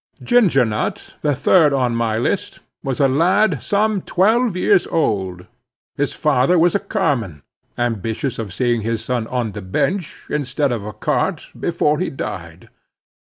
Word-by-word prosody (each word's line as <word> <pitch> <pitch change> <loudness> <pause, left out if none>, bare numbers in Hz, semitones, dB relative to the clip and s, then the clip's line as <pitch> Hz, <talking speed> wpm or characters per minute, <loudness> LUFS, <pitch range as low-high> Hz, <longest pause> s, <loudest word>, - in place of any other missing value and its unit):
Ginger 195 - +4
Nut, 105 -1 -3
the 145 -2 +1
third 150 +2 +4
on 125 -3 +1
my 115 -2 0
list, 115 - -2 0.2
was 135 -2 -3
a 140 - +5
lad 180 +10 +2
some 210 -1 +1
twelve 215 +3 +2
years 190 0 +3
old. 95 - -1 0.5
His 145 0 -1
father 150 +3 +2
was 170 +1 +4
a 200 - +2
carman, 135 - -2 0.3
ambitious 115 +2 -2
of 110 -4 -4
seeing 120 +5 0
his 110 0 -3
son 120 -3 -1
on 120 -3 -2
the 105 - -7
bench 160 - -2
instead 145 -1 -1
of 115 -4 -2
a 105 +1 -6
cart, 105 - -2
before 155 -3 0
he 185 - -1
died. 85 -9 -7
135 Hz, 155 wpm, -20 LUFS, 110-175 Hz, 0.5 s, a